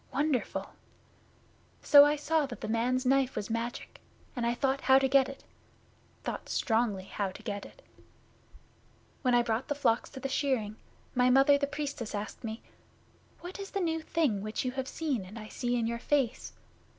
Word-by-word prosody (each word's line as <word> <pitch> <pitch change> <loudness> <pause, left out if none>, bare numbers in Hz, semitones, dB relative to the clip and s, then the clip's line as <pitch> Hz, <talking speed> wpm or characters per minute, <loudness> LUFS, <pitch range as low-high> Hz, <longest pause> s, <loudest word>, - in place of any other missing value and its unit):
Wonderful! 280 -1 -1 1.1
So 285 -1 +9
I 295 +1 +3
saw 300 0 +1
that 240 - -9
the - - -4
man's 245 +4 0
knife 265 0 +2
was 210 - -4
magic, 230 +1 -4 0.3
and 240 -2 -1
I 235 - +1
thought 270 +1 0
how 265 0 +6
to 270 0 +3
get 265 0 +4
it, 275 - -10 0.8
thought - - -5
strongly 220 -5 +1
how 195 +1 -3
to 185 - -11
get 205 -3 -4
it. - - -19 1.4
'When 250 -2 +3
I 240 - +4
brought 230 +2 -1
the 290 - -1
flocks 235 -5 +1
to 265 - -9
the 270 - -3
shearing, 260 -6 -1 0.4
my 250 0 +3
Mother 270 +2 +6
the 280 0 0
Priestess 280 -7 -4
asked 205 +4 -6
me, 225 0 -5 0.8
"What 360 +3 -8
is 395 -1 -6
the 395 - -2
new 325 -3 0
thing 305 -11 0
which 215 +4 -3
you 250 - 0
have 265 0 -4
seen 275 -8 -2
and 190 +5 -10
I 215 -1 -8
see 245 0 -1
in 235 -2 0
your 235 +1 -2
face?" 265 -2 0
255 Hz, 185 wpm, -30 LUFS, 230-280 Hz, 1.4 s, So